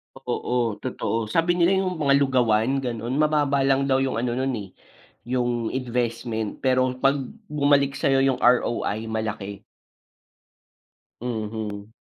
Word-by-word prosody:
Oo, 125 -3 -1
totoo. 115 -3 -2
Sabi 165 +4 +2
nila 180 +2 +3
yung 185 -1 -1
mga 140 -3 +3
lugawan, 130 -1 +2
ganun, 120 0 -3
mababa 145 -2 +2
lang 135 0 +2
daw 130 - +3
yung 130 -3 -1
ano 120 0 -1
nun, 130 +1 0
eh, 100 - -7 0.6
yung 120 -2 -1
investment. 120 -3 -2
Pero, 130 -1 +2
'pag 135 +1 +3 0.3
bumalik 140 -2 +2
sa'yo 135 0 +2
yung 135 -2 +2
ROI 120 -3 +2
malaki. 110 -3 -4 1.6
Mhm. 110 -3 -4
125 Hz, 125 wpm, -24 LUFS, 115-135 Hz, 1.6 s, nila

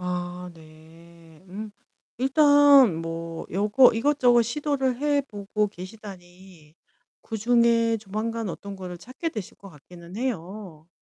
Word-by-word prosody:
아 180 0 -4
네. 160 +1 -18
음. 210 +3 -7 0.5
일단 285 - +6
뭐 165 0 -6
요거 210 +7 +4
이것저것 245 -1 +3
시도를 265 +1 -1
해 290 0 +1
보고 210 0 -2
계시다니 185 -4 -13 0.5
그중에 230 0 +2
조만간 220 +1 -4
어떤 200 +3 -7
거를 180 -2 -7
찾게 255 - -6
되실 215 - -8
것 200 - -13
같기는 170 +3 -14
해요. 190 -8 -5
205 Hz, 230 characters per minute, -25 LUFS, 175-240 Hz, 0.5 s, 일단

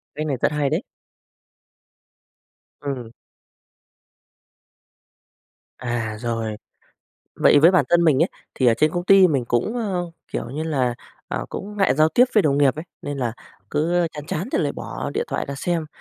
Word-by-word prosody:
Cách 155 +1 -3
này 135 -3 -1
rất - - +2
hay 145 -2 0
đấy. 165 +9 -1 2.0
Ừm. 130 -5 -5 2.7
À, 120 -3 -3
rồi. 115 -2 -2 0.8
Vậy - - +5
với 165 +5 +7
bản 185 - +4
thân 170 0 +4
mình 155 -1 +4
ấy, 175 - +2 0.3
thì 130 - +1
ở 115 - +6
trên 155 +6 +2
công 175 +1 -3
ty 195 -1 +7
mình 135 -5 0
cũng, 120 - 0
ơ, 185 -7 -2 0.2
kiểu - - -3
như 150 +3 -4
là, 130 -7 0 0.3
ờ, - - -3
cũng 210 +1 -7
ngại 195 -7 +3
giao 155 +2 +4
tiếp 240 +10 +5
với 210 - +5
đồng 140 -1 +2
nghiệp 135 -2 +4
ấy, 155 - -5 0.2
nên 145 -1 -4
là 120 -3 -1 0.4
cứ 170 +3 +1
chán 150 0 -7
chán 175 +9 -3
thì - - +2
lại 145 -3 0
bỏ - - -5
điện - - 0
thoại - - -2
ra 140 - -3
xem, 165 +1 -1
150 Hz, 170 wpm, -22 LUFS, 130-175 Hz, 2.7 s, với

